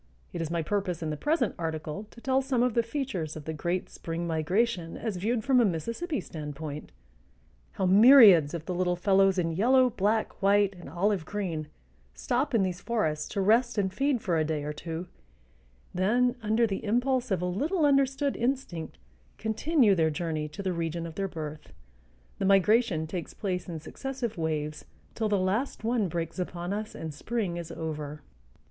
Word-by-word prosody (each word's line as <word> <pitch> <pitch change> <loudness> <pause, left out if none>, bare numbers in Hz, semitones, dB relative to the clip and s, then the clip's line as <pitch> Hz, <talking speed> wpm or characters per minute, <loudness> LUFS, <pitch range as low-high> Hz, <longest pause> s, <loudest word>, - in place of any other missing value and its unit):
It - - -3
is 160 - -3
my 170 -1 -1
purpose 180 -2 -2
in 155 - -2
the - - -2
present 280 - 0
article 160 +4 -4
to - - -15
tell 265 +2 +1
some 260 -3 +1
of 250 -2 +1
the 235 - +3
features 230 - -3
of 155 -2 -8
the 160 - -3
great 175 +4 -2
spring 165 +1 -5
migration 170 +3 0
as 215 -5 -3
viewed 220 +5 -1
from 265 -1 +4
a - - +5
Mississippi 230 - -2
standpoint; 150 -1 -7 0.8
how 190 - -1
myriads 195 - +8
of 165 -1 -6
the 185 - -3
little 180 0 +1
fellows 195 +1 +3
in 165 -2 +1
yellow, 250 +8 +4
black, 215 +2 0
white, 200 0 +4
and 175 -5 -11
olive 185 +3 0
green 165 -4 -3 0.5
stop 245 - -1
in 210 - +4
these 180 -1 -3
forests 160 -11 -1
to 200 - -2
rest 230 +4 +3
and 190 -2 0
feed 270 0 0
for 170 -4 +1
a - - +2
day 155 -1 -2
or 150 +1 -3
two, 165 +3 -5 0.9
then 240 +7 +2
under 220 +2 +2
the 195 -3 -3
impulse 245 +3 +1
of 190 -4 +1
a 180 - -2
little 295 - 0
understood 275 0 +2
instinct 235 - -2 0.4
continue 220 +1 +2
their 160 -4 +2
journey 155 -1 -2
to 150 +6 -8
the 185 -1 -1
region 170 0 -3
of 165 - -7
their 195 +3 -2
birth. 155 -4 -7 0.7
The - - 0
migration 195 -3 +3
takes 165 +1 -6
place 185 -3 -3
in 165 -2 -5
successive 255 - -5
waves, 155 -2 -2 0.3
till 220 -2 -1
the 205 - +2
last 200 +8 -1
one 225 -3 +1
breaks 165 +1 -4
upon 175 +1 -3
us 215 +1 -5
and 160 -2 -6
spring 200 0 -3
is 170 -1 -6
over. 150 -3 -5
190 Hz, 180 wpm, -28 LUFS, 165-235 Hz, 0.9 s, myriads